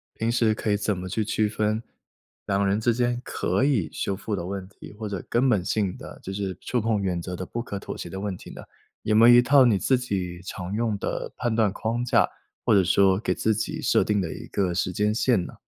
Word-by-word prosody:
平 115 +1 -1
时 115 -2 +3
可 105 - -2
以 105 - +3
怎 105 -2 -1
么 90 - -5
去 105 +4 -1
区 110 0 +1
分 110 +1 -1 0.6
2 100 0 +1
人 100 +2 +1
之 115 +1 +2
间 120 0 0
可 - - -1
以 125 - +1
修 100 - -2
复 105 +1 -3
的 85 - -4
问 95 0 -5
题？ 105 - -13
或 110 +1 -6
者 100 -3 -4
根 125 +3 +2
本 105 -7 +2
性 100 -1 -1
的 - - -10
就 95 - -5
是 95 -2 -3
触 125 -3 -1
碰 110 -2 0
原 90 -3 -1
则 90 +1 -5
的 95 - -5
不 120 +6 -4
可 100 -4 -5
妥 - - -7
协 85 - -6
的 95 - -6
问 100 -1 -3
题 - - -12
呢？ - - -9 0.4
有 105 - +1
没 115 +2 +7
有 120 - +9
一 120 - +8
套 135 +1 +6
你 110 -5 +4
自 130 +8 +2
己 95 -7 -3
常 90 0 -6
用 110 -2 0
的 - - -4
判 120 -2 -1
断 110 -3 +3
框 115 +4 -2
架， 120 -1 +3 0.4
或 110 - +4
者 100 - +5
说 95 +1 +4
给 115 - 0
自 110 - +1
己 110 +1 -3
设 - - +3
定 105 -1 +1
的 80 -4 -3
一 - - -9
个 90 -3 0
时 90 +1 0
间 105 +3 +1
线 110 -5 +2
呢？ - - -9
105 Hz, 270 characters per minute, -25 LUFS, 95-115 Hz, 0.6 s, 有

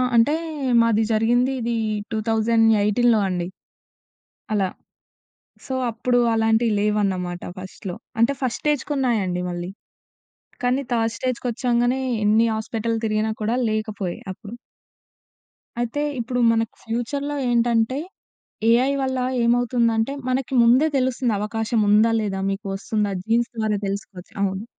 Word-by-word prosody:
అంటే 230 +6 +4 0.5
మాది 225 -1 +3
జరిగింది 240 +4 +2
ఇది 235 +1 -1 0.4
2018లో 225 0 +3
అండి. 175 -1 -2 1.1
అలా. 200 -3 +1 1.0
సో 265 - -3 0.2
అప్పుడు 245 +2 0 0.2
అలాంటివి 225 +1 +2
లేవన్నమాట 195 -4 0 0.2
ఫస్ట్‌లో. 185 -1 -7 0.2
అంటే 235 +4 +4
ఫస్ట్‌ 255 -3 -1
స్టేజ్‌కున్నాయండి 250 -11 0
మళ్ళీ. 175 +1 -5 0.9
కానీ 250 +2 +2
థర్డ్ 225 -1 +1
స్టేజ్‌కొచ్చాంగానే 245 0 0 0.2
ఎన్ని 220 +2 +4
హాస్పిటల్ 225 +1 -2
తిరిగినా 215 0 0
కూడా 220 +3 0
లేకపోయే 215 -4 -3 0.2
అప్పుడు. 205 +3 -11 1.3
అయితే 240 +4 -1 0.2
ఇప్పుడు 245 +1 -2
మనకు 225 -1 0
ఫ్యూచర్‌లో 280 +6 -3
ఏంటంటే, 235 +1 +2 0.7
ఏఐ 250 +4 +4
వల్ల 260 -1 -1 0.3
ఏమవుతుందంటే 235 0 +2 0.2
మనకి 260 +1 -1
ముందే 250 +7 +5
తెలుస్తుంది 255 -3 +1
అవకాశం 225 +2 -1
ఉందా? 215 +2 +5
లేదా? 195 -3 -2
మీకు 195 +2 -4
వస్తుందా 205 +1 -1
జీన్స్ 230 +2 +1
ద్వారా 215 -2 0
తెలుసుకోవచ్చు. 195 -2 -6
అవును. 195 +1 -1
225 Hz, 110 wpm, -22 LUFS, 210-245 Hz, 1.3 s, ముందే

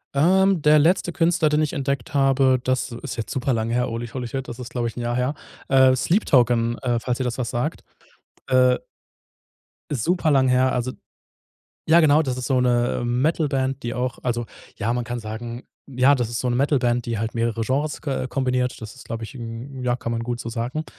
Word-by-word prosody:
Ähm, 185 +4 +4
der 150 0 +6
letzte 175 +3 +2
Künstler, 165 -2 +2
den 150 +1 +2
ich 150 - -1
entdeckt 140 -4 -3
habe, 135 -2 +3
das 130 0 -1
ist 120 +3 -6
jetzt 115 - -5
super 130 0 0
lang 110 -1 -1
her, 125 +1 +1
holy, 115 0 -4
holy 125 0 -5
shit, 135 +2 -5
das 115 - -7
ist, 125 -1 -8
glaube 120 -2 -1
ich, 115 - -6
'n - - -3
Jahr 120 0 -1
her. 125 +4 0 0.3
Äh, 130 -1 +5
„Sleep 180 - +1
Token“, 120 -3 +3
äh, 120 -3 0
falls 125 +1 -2
dir 130 - 0
das 125 0 -2
was 120 -2 -3
sagt. 130 +6 -2 0.6
Äh. 125 -1 +4 1.1
Ist 130 -7 -1
super 175 0 +1
lang 135 -3 +4
her. 130 +1 +3
Also 125 +1 -1 0.9
ja, 165 +2 +6
genau, 155 -1 +5
das 130 -4 -3
ist 125 - -4
so 130 -2 +2
'ne, 120 -1 +1
äh, - - -3
Metal-Band, 135 0 0
die 120 - -3
auch 125 0 -3
Also, 120 -1 -1 0.3
ja, 115 +2 -1
man 125 0 -1
kann 120 0 -4
sagen 115 +2 -6 0.3
ja, 130 +2 +4
das 120 -5 -1
ist 120 - -3
so 125 - -1
'ne 120 - 0
Metal-Band, 125 -3 +1
die 115 - -1
halt 115 +2 -3
mehrere 115 -1 -1
Genres 145 +6 -1
k 135 -3 -2
kombiniert. 125 -2 -1
Das 110 -1 -8
ist, 130 - -14
glaube 115 0 -5
ich - - -7
hm, 120 +2 -7
ja, 120 -1 +1
kann 115 -1 -5
man 115 0 -2
gut 120 0 -3
so 115 - -6
sagen. 120 +7 -3
125 Hz, 220 wpm, -23 LUFS, 120-140 Hz, 1.1 s, der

